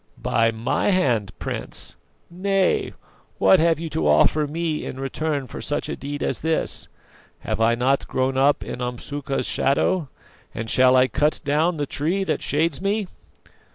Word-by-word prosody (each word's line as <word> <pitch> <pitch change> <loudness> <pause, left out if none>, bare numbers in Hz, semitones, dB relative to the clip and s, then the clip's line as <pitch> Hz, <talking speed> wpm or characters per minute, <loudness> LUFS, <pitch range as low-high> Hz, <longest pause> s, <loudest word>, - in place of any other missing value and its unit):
"By 115 0 +2
my 115 - 0
hand, 120 - +1
Prince! - - -5 0.4
Nay; 195 +1 +1 0.4
what 190 - +5
have 165 0 +3
you 165 - -4
to 80 - -1
offer 75 - +4
me 160 +1 -2
in 130 - -6
return 140 +1 -2
for 125 - -8
such 145 +1 -2
a - - -2
deed 145 +1 -5
as - - -2
this? 160 0 -1 0.5
Have - - -3
I 115 +1 +4
not 130 +3 +1
grown 130 +1 0
up 135 +2 +3
in 125 - -6
Umsuka's 135 +3 -3
shadow, 145 +3 +1 0.5
and 110 0 -4
shall 130 0 +5
I 130 0 +5
cut 150 +6 +1
down 155 +4 +1
the 145 - -1
tree 165 +8 -1
that - - -1
shades 155 +2 0
me?" 200 +2 0
145 Hz, 160 wpm, -23 LUFS, 130-165 Hz, 0.5 s, what